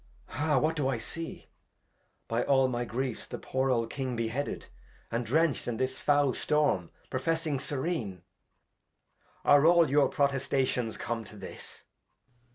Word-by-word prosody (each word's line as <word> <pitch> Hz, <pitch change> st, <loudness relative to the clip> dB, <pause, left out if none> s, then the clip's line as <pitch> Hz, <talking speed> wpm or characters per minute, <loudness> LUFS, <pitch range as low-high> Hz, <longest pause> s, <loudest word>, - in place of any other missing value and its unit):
Ha! 150 Hz, +1 st, +1 dB
What 155 Hz, +5 st, +2 dB
do 145 Hz, -4 st, 0 dB
I 135 Hz, -3 st, 0 dB
see? 165 Hz, +8 st, -7 dB, 0.8 s
By 115 Hz, +1 st, 0 dB
aU 135 Hz, -1 st, +4 dB
my 120 Hz, -1 st, -2 dB
Griefs 125 Hz, +1 st, -3 dB
the -, -, -5 dB
poor 130 Hz, +1 st, -1 dB
old 115 Hz, -2 st, +1 dB
King 130 Hz, -3 st, -3 dB
bareheaded. 115 Hz, +5 st, -2 dB, 0.5 s
And 115 Hz, 0 st, -1 dB
drencht 155 Hz, +1 st, +2 dB
in 120 Hz, -2 st, -2 dB
this 130 Hz, +1 st, -1 dB
fowl 145 Hz, -2 st, +3 dB
Storm, 145 Hz, -, +1 dB, 0.2 s
professing 155 Hz, +1 st, 0 dB
Syren, 130 Hz, -, -3 dB, 1.2 s
Are 145 Hz, 0 st, +6 dB
all 170 Hz, -4 st, +5 dB
your 145 Hz, 0 st, +4 dB
Protestations 135 Hz, -4 st, 0 dB
come 115 Hz, -1 st, -3 dB
to 105 Hz, -, -13 dB
this 100 Hz, -, -10 dB
130 Hz, 140 wpm, -30 LUFS, 120-145 Hz, 1.2 s, Are